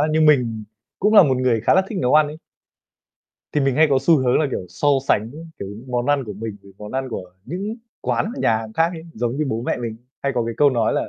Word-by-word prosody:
á, 150 - +3
nhưng 155 0 +3
mình 120 -7 +2 0.3
cũng 210 +3 +2
là 205 - +10
một 135 -6 +2
người 125 -3 +1
khá 120 - +3
là 190 - +5
thích 210 - -4
nấu 125 0 +2
ăn 155 -1 +6
ấy. 150 +1 -7 1.2
Thì 150 - +1
mình 135 -2 +1
hay 160 - +6
có 135 - +4
xu 165 +2 +4
hướng 125 -2 +2
là, 155 - +2
kiểu, 95 - -4
so 90 +12 -1 0.2
sánh 110 +2 +2
với, 150 +5 -10 0.2
kiểu, 100 - -6
những 105 +5 -10
món 120 0 -1
ăn 145 -2 +2
của 105 - -6
mình 105 +1 -6
với 100 - -16
món 105 +2 -9
ăn 130 0 -2
của 90 -6 -7
những 195 - -4 0.2
quán, 220 - -1
nhà 110 - +2
hàng 110 -1 -8
khác 165 +6 +2
ấy. 160 - -8
Giống 120 +2 -2
như, 155 - 0
bố 115 -1 -2
mẹ - - -1
mình 115 -2 -5 0.3
hay 140 - 0
có 120 -2 0
cái 115 0 -4
câu 145 -1 +5
nói 120 -4 +1
là - - -1
130 Hz, 275 wpm, -21 LUFS, 115-150 Hz, 1.2 s, là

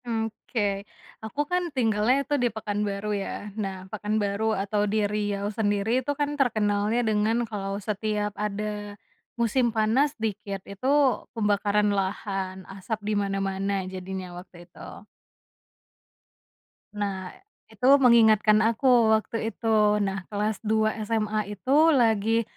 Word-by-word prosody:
Oke, 220 -3 -2 0.4
aku 220 +6 -8
kan 360 -1 0
tinggalnya 240 +3 +2
itu 290 - -3
di 245 - +3
Pekanbaru 210 -1 -2
ya 200 0 -5
nah 195 -3 -5
Pekanbaru 215 0 -1
atau 205 +2 -1
di 215 0 +1
Riau 205 -1 -2
sendiri 215 +3 +1
itu 275 +3 -2
kan 290 0 -1
terkenalnya 215 -1 +1
dengan 215 +1 +1
kalau 195 -2 -3
setiap 210 0 -2
ada, 210 0 -4 0.4
musim 235 +2 +2
panas 225 +6 +2
dikit 210 -3 -4
itu, 200 +6 -6 0.5
pembakaran 210 -1 +2
lahan, 190 -1 -3 0.2
asap 220 +3 -3
dimana-mana 195 -1 -1 0.2
jadinya 185 0 -5
waktu 175 -1 -15
itu. 175 - -12 1.9
Nah, 195 -3 -4 0.4
itu 250 - -5 0.2
mengingatkan 220 -3 +6
aku 230 +4 -2 0.3
waktu 220 +1 -2
itu 225 0 -5 0.4
nah 195 -1 -4
kelas 210 0 -2
2 220 0 +1 0.2
SMA 215 -1 0
itu 210 +6 -5 0.2
lagi, 225 -2 +2
210 Hz, 115 wpm, -26 LUFS, 200-225 Hz, 1.9 s, mengingatkan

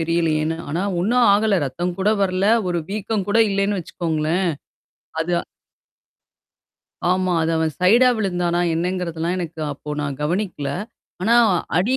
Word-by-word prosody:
தெரியலையேன்னு. 160 -1 0
ஆனா, 165 +6 -1 0.2
ஒண்ணும் 235 +6 +3
ஆகல. 210 0 +3
ரத்தம் 175 +7 -3
கூட 200 +2 +2
வரல. 185 0 +1 0.2
ஒரு 175 -1 0
வீக்கம் 210 -1 -2
கூட 215 +3 +2
இல்லன்னு 200 0 0
வச்சுக்கோங்களேன். 165 +1 -1 0.8
அது 170 +2 -3 1.8
ஆமா. 185 0 0
அது 160 - 0
அவன் 160 -1 0
சைடா 230 +8 +5
விழுந்தானா 180 -4 0
என்னங்கிறதெல்லாம் 175 0 -2
எனக்கு 165 -2 -5
அப்போ 150 +1 -9
நான் 140 -2 -4
கவனிக்கல. 170 -2 -2 0.5
ஆனா 225 +5 +3 0.4
அடி 215 +8 +1
180 Hz, 125 wpm, -21 LUFS, 160-195 Hz, 1.8 s, சைடா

